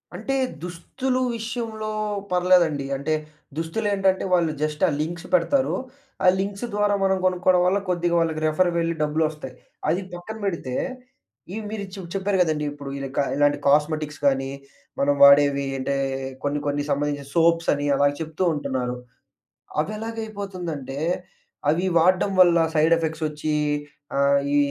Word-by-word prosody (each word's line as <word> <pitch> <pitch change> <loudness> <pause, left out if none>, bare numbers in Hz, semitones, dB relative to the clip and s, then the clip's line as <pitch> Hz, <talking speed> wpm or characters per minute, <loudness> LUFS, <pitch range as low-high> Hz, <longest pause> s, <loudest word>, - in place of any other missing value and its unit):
అంటే, 270 -1 -2 0.3
దుస్తులు 250 +10 -3 0.2
విషయంలో 220 -1 -4 0.4
పర్లేదండి. 175 -6 +3
అంటే 145 +3 -1 0.4
దుస్తులేంటంటే, 195 +3 0
వాళ్ళు 170 -3 +3
జస్ట్ 155 +1 -1
ఆ - - +2
లింక్స్ 175 +3 -4
పెడతారు. 275 0 +2 0.5
ఆ - - +6
లింక్స్ 200 +3 -3
ద్వారా 205 0 +2
మనం 190 0 +3
గొనుక్కోవడం 180 0 +3
వల్ల 185 +2 +3
కొద్దిగా 175 -1 +1
వాళ్ళకి 160 -1 0
రిఫర్ 155 +4 +2
వెళ్లి 170 0 0
డబ్బులొస్తాయి. 150 -3 -1 0.4
అది 175 +5 +1
పక్కన 175 +5 -7
పెడితే 165 -9 -3 0.8
ఈ - - -4
మీరు 215 -1 -4
చె 195 - -7
చెప్పారు 195 0 0
గదండీ! 155 -3 +1
ఇప్పుడు 145 -1 -8
ఇలా 135 0 -4
కా 145 - +4
ఇలాంటి 145 0 +3
కాస్మెటిక్స్ 150 +1 +1
గానీ, 135 -1 +2 0.5
మనం 140 +1 +3
వాడేవి 140 0 +7
అంటే 135 +1 -1 0.5
కొన్ని 145 +1 0
కొన్ని 145 0 0
సంబంధించిన 145 0 -1
సోప్స్ 165 0 +3
అని 145 0 -2
అలా 140 +1 +4
చెప్తూ 160 +3 -3
ఉంటున్నారు. 130 -4 -2 0.8
అవి 160 - 0
ఎలాగయిపోతుందంటే 200 - -5 0.7
అవి 170 +5 +2
వాడ్డం 185 +3 +3
వల్ల 175 -2 +6 0.2
సైడ్ 160 +2 +4
ఎఫెక్ట్స్ 160 -1 -3
వచ్చి 150 0 -3 0.6
ఆహ్, 140 0 +4 0.2
ఈ - - +5
165 Hz, 140 wpm, -24 LUFS, 145-190 Hz, 0.8 s, వాడేవి